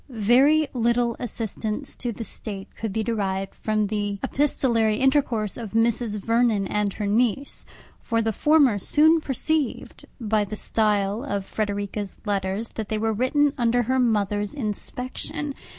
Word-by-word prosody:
Very 265 +7 +4
little 235 -1 +1
assistance 225 +2 -3
to 245 - -1
the 230 +1 -6
State 200 -2 -5
could 220 -2 -4
be 220 +2 -1
derived 195 -4 -2
from 215 -1 0
the 205 -1 -2
epistolary 235 -6 +2
intercourse 260 -6 +1
of 225 -4 -7
Mrs. 225 -1 +1
Vernon 230 -1 +2
and 210 -1 -1
her 210 - -4
niece; 235 +6 0 0.3
for 230 - 0
the 225 -1 0
former 285 -5 +4
soon 315 - +4
perceived, 295 0 -2
by 215 -2 +1
the 205 +1 -5
style 210 0 0
of 200 -8 -3
Frederica's 205 -1 -3
letters, 200 +2 -2
that 220 -2 -5
they 220 - 0
were 220 +1 0
written 275 +5 +2
under 240 +1 +2
her 260 +3 +1
mother's 205 -3 0
inspection! 255 +4 -4
225 Hz, 145 wpm, -24 LUFS, 205-250 Hz, 0.3 s, Very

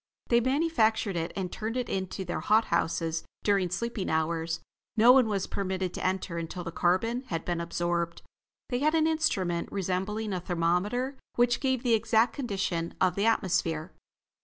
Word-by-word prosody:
They 235 - +5
manufactured 240 - +1
it 165 0 -2
and 185 -2 -3
turned 225 +3 -3
it 250 -2 -1
into 190 0 -3
their 175 - -3
hot 220 +1 +3
houses 165 -1 0 0.2
during 195 -3 +2
sleeping 205 +2 -3
hours. 160 +1 0 0.4
No 230 +3 +8
one 255 -3 +5
was 195 -3 0
permitted 190 -2 -2
to - - -5
enter 185 -2 -1
until 170 +2 -5
the 165 - -5
carbon 190 +9 +1
had 165 -5 -3
been 175 -1 -1
absorbed. 170 0 -2 0.5
They 245 -2 0
had 305 +3 +2
an 315 -1 +3
instrument 190 - 0
resembling 200 +3 -2
a 185 - -1
thermometer 180 +10 0 0.2
which 240 0 +3
gave 260 -3 0
the 240 -2 +3
exact 225 +1 +3
condition 195 -9 -2
of 180 - +3
the 200 +4 +1
atmosphere. 175 -6 0
190 Hz, 165 wpm, -29 LUFS, 175-235 Hz, 0.5 s, No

